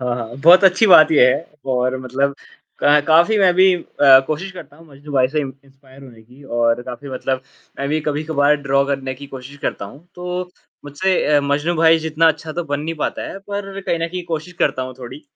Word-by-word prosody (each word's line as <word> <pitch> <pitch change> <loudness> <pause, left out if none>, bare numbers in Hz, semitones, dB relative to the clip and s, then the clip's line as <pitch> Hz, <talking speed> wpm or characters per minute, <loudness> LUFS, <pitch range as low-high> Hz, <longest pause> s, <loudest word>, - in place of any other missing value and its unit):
हाँ, 125 -1 -2
हाँ, 115 0 -7
बहुत 175 +6 +6
अच्छी 190 +4 +4
बात 170 -6 +7
ये 135 -4 +6
है 160 - -1 0.3
और 125 +1 0
मतलब 135 +2 -2 0.5
क 145 +1 +5
काफ़ी 170 +7 +4
मैं 190 -3 +4
भी 185 +1 +5
अ, 140 -5 +4
कोशिश 160 +6 -4
करता 180 -5 -12
हूँ, 165 +1 -18
मजनू 145 +1 -13
भाई 130 -2 +2
से 150 +2 -2
इन्स 135 -3 -6
इंस्पायर 135 0 -19
होने 115 -4 -15
की 125 +5 -19
और 120 -1 0
काफ़ी 125 +3 -9
मतलब 130 0 -3 0.4
मैं 140 - -3
भी 155 +2 -1
कभी 150 0 -3
कभार 150 -1 +2
ड्रा 140 0 +1
करने 135 -1 -3
की 140 +2 -11
कोशिश 135 +1 -11
करता - - -3
हूँ, 140 - -14
तो 180 0 -5 0.3
मुझसे 175 +7 -1 0.2
अ, - - +3
मजनू 145 +4 -1
भाई 165 0 +4
जितना 160 +1 +2
अच्छा 160 0 -3
तो 175 +2 -4
बन 145 -1 -3
नहीं 165 +2 -4
पाता 150 - -3
है, - - -8
पर 195 0 -7
कहीं 170 -3 -2
न 165 - -1
कहीं 180 +1 -6
कोशिश 165 +2 -5
करता 135 -2 0
हूँ 130 0 -7
थोड़ी, 130 +2 -9
अ, - - -24
145 Hz, 225 wpm, -18 LUFS, 130-165 Hz, 0.5 s, बात